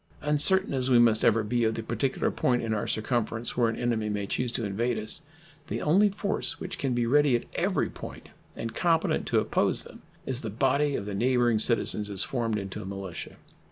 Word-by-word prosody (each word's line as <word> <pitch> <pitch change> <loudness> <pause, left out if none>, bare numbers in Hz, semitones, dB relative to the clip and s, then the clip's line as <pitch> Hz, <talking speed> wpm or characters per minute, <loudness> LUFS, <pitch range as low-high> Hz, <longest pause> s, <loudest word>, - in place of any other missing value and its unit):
Uncertain 150 +5 +4
as 130 -1 0
we 125 - +5
must 115 -2 +4
ever 115 0 +3
be 120 +3 0
of 110 0 +1
the 115 - -4
particular 135 +4 -1
point 125 -1 0
in 110 -1 -1
our 105 - -2
circumference 115 0 -2
where 120 -2 +2
an 115 - -3
enemy 115 -3 -1
may 105 -1 -2
choose 120 +4 -2
to 120 -2 -3
invade 115 +4 -1
us, 110 +8 +1 0.5
the - - -3
only 195 +7 +3
force 200 +1 -1
which 185 - -6
can 130 -3 -1
be 120 -1 +1
ready 145 +1 +3
at 120 - -1
every - - 0
point - - -10 0.3
and 115 0 -5
competent 165 +4 +1
to - - +2
oppose - - 0
them - - -14 0.2
is 130 -1 -2
the 110 - -4
body 135 +6 +1
of 100 - -3
the 105 - -5
neighboring 120 +1 +2
citizens 105 -2 +1
as 100 -2 +2
formed 115 -4 -2
into 95 -2 -6
a - - -7
militia. 95 -2 -7
120 Hz, 210 wpm, -27 LUFS, 110-135 Hz, 0.5 s, we